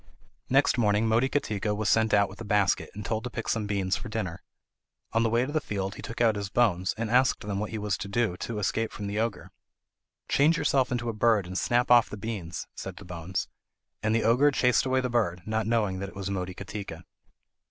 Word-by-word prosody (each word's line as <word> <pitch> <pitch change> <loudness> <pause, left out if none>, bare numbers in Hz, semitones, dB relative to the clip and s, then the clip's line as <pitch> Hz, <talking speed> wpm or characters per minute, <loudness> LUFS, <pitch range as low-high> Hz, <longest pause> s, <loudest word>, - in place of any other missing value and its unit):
Next 135 -1 +3
morning 105 0 +3
Motikatika 110 -3 +1
was 105 0 -2
sent 110 +1 +3
out 100 -1 +4
with 95 +4 -12
a - - -3
basket, 105 -2 +1
and 105 -1 -6
told 110 -1 -2
to 125 - -4
pick 115 -2 -5
some 110 -2 0
beans 100 -1 0
for 120 - -6
dinner. 100 -6 -4 0.7
On 115 - +3
the 115 - +2
way 120 +2 +2
to 140 - -5
the 155 0 0
field 100 -4 -3
he - - -9
took 115 - -7
out 115 -3 +4
his 100 -1 -4
bones 95 -5 +1
and 115 0 -2
asked 130 +1 +3
them 100 -1 -3
what 105 - -3
he 110 - -4
was 105 -1 -2
to - - -5
do 105 -2 0
to 115 +2 -4
escape 115 +2 -1
from 105 - -6
the 100 +1 -2
ogre. 115 -1 -2 0.8
"Change 155 +4 +3
yourself 140 -4 +2
into 120 -1 -1
a 115 - -1
bird 110 -2 +3
and 90 +1 -7
snap 120 +6 +1
off 120 -2 +6
the 105 - -7
beans," 100 -6 -5
said - - -7
the - - -10
bones. 90 +1 -4 0.5
And 110 +1 +1
the 115 - +2
ogre 125 +6 +5
chased 125 -2 +2
away 130 0 +2
the 130 - -1
bird, 90 -8 0
not 110 0 -1
knowing 105 -5 +1
that 100 0 -4
it - - -16
was 100 0 -4
Motikatika. 95 -1 -5
110 Hz, 225 wpm, -28 LUFS, 100-120 Hz, 0.8 s, off